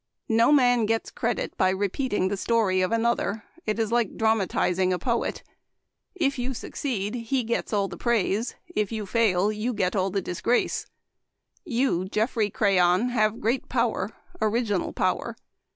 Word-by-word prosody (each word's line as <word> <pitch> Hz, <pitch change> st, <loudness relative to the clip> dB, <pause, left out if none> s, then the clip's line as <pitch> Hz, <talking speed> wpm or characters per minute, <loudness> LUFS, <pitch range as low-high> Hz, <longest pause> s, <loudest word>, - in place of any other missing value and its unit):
No 230 Hz, +4 st, +4 dB
man 245 Hz, -6 st, +4 dB
gets 225 Hz, +1 st, -1 dB
credit 235 Hz, 0 st, -2 dB
by 185 Hz, -, +3 dB
re 195 Hz, +2 st, 0 dB
peating 205 Hz, -3 st, -1 dB
the 200 Hz, -, -1 dB
story 200 Hz, -3 st, +1 dB
of 185 Hz, -, 0 dB
another; 230 Hz, -2 st, 0 dB, 0.2 s
it 215 Hz, -, 0 dB
is 225 Hz, -1 st, -1 dB
like 235 Hz, -4 st, 0 dB
dram 220 Hz, 0 st, +3 dB
atizing 185 Hz, -1 st, +1 dB
a 180 Hz, -, +1 dB
poet. 235 Hz, +6 st, -2 dB, 0.7 s
If 280 Hz, -7 st, 0 dB
you 250 Hz, +1 st, -2 dB
succeed, 215 Hz, -5 st, -3 dB
he 245 Hz, +2 st, -1 dB
gets 235 Hz, +1 st, -2 dB
all 200 Hz, -2 st, +1 dB
the 175 Hz, -2 st, -8 dB
praise; 230 Hz, 0 st, 0 dB, 0.2 s
if 210 Hz, -, 0 dB
you 215 Hz, -2 st, -3 dB
i2J\,you 215 Hz, +2 st, +1 dB
get 185 Hz, -1 st, 0 dB
all 190 Hz, -1 st, +1 dB
the 195 Hz, +1 st, -1 dB
disgrace. 185 Hz, +6 st, -1 dB, 0.8 s
You, 245 Hz, -, 0 dB
Geoffrey 215 Hz, +2 st, 0 dB
Crayon, 190 Hz, +2 st, +3 dB
have 220 Hz, -2 st, +1 dB
great 235 Hz, +4 st, -1 dB
power 230 Hz, -5 st, 0 dB, 0.2 s
— 355 Hz, -1 st, -23 dB
original 215 Hz, -3 st, 0 dB
power. -, -, -1 dB
220 Hz, 160 wpm, -26 LUFS, 195-235 Hz, 0.8 s, No